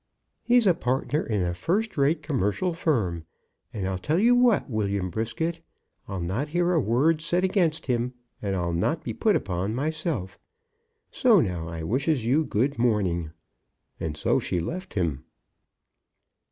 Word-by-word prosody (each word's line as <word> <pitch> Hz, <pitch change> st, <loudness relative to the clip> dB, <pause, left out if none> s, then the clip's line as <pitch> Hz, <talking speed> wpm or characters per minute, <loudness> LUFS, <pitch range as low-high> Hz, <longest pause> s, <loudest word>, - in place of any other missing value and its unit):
"He's 245 Hz, -1 st, +4 dB
a 185 Hz, -, +6 dB
partner 135 Hz, +1 st, -1 dB
in 105 Hz, -5 st, -1 dB
a 85 Hz, 0 st, -1 dB
first 195 Hz, -, -1 dB
rate 150 Hz, +2 st, +2 dB
commercial 145 Hz, -, 0 dB
firm. 110 Hz, -, 0 dB, 0.5 s
And 100 Hz, -4 st, -3 dB
I'll 95 Hz, -1 st, -2 dB
tell 150 Hz, -, 0 dB
you 235 Hz, +6 st, +5 dB
what, 245 Hz, -3 st, +4 dB
William 100 Hz, -6 st, -1 dB
Brisket, 160 Hz, -, -2 dB, 0.5 s
I'll 95 Hz, -1 st, -4 dB
not 105 Hz, -, -2 dB
hear 175 Hz, +2 st, +1 dB
a 165 Hz, -, +3 dB
word 145 Hz, +7 st, +2 dB
said 175 Hz, +3 st, 0 dB
against 175 Hz, -5 st, +1 dB
him, 125 Hz, 0 st, -1 dB, 0.3 s
and 100 Hz, -2 st, -1 dB
I'll 85 Hz, -2 st, -1 dB
not 85 Hz, -, 0 dB
be -, -, -4 dB
put -, -, +2 dB
upon 95 Hz, +5 st, -1 dB
myself. 145 Hz, -, -3 dB, 0.7 s
So 235 Hz, -6 st, +5 dB
now 90 Hz, -, -1 dB
I 80 Hz, -1 st, -5 dB
wishes 130 Hz, -, 0 dB
you 140 Hz, +7 st, +3 dB
good 135 Hz, +1 st, 0 dB
morning." 95 Hz, -9 st, +1 dB, 0.7 s
And 75 Hz, -2 st, -4 dB
so -, -, +2 dB
she 90 Hz, -, -1 dB
left 180 Hz, -, -5 dB
him. 80 Hz, -8 st, -1 dB
125 Hz, 155 wpm, -26 LUFS, -, 0.7 s, a